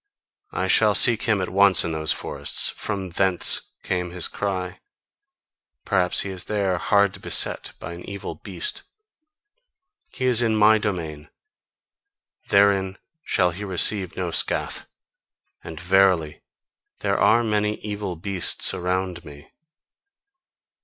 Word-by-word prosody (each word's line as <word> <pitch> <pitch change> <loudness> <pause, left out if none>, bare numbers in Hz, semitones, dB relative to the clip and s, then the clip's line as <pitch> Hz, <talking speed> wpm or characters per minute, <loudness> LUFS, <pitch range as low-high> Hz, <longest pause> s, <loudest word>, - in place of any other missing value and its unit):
I - - -2
shall - - +4
seek 115 -3 +4
him 105 -3 +2
at 90 - -3
once 100 -1 +4
in 85 - -2
those 80 -1 -1
forests: - - -1
FROM 95 -3 -5
THENCE 95 0 0
came 90 -1 -2
his 90 0 -2
cry. 95 -2 -4 1.1
Perhaps 90 -2 +2
he 100 - -4
is 95 -1 -6
there 100 -4 -1
hard 100 +1 +1
beset - - -1
by 85 - -7
an 85 - -10
evil 100 0 -6
beast. 420 - -4 1.3
He 130 - -5
is 125 -2 +6
in 115 -2 +1
MY 110 +1 +5
domain: 80 -8 -4 1.2
therein 100 -1 +3 0.3
shall 90 -2 +1
he 95 +5 -7
receive 95 -1 0
no - - -3
scath! - - -1 0.8
And 80 -1 -8
verily, 90 -3 +2 0.6
there - - 0
are 120 +1 +4
many 105 -1 0
evil 105 -3 -5
beasts 95 +2 +1
about 90 -1 -3
me." 75 -1 -14
95 Hz, 125 wpm, -23 LUFS, 90-100 Hz, 1.3 s, is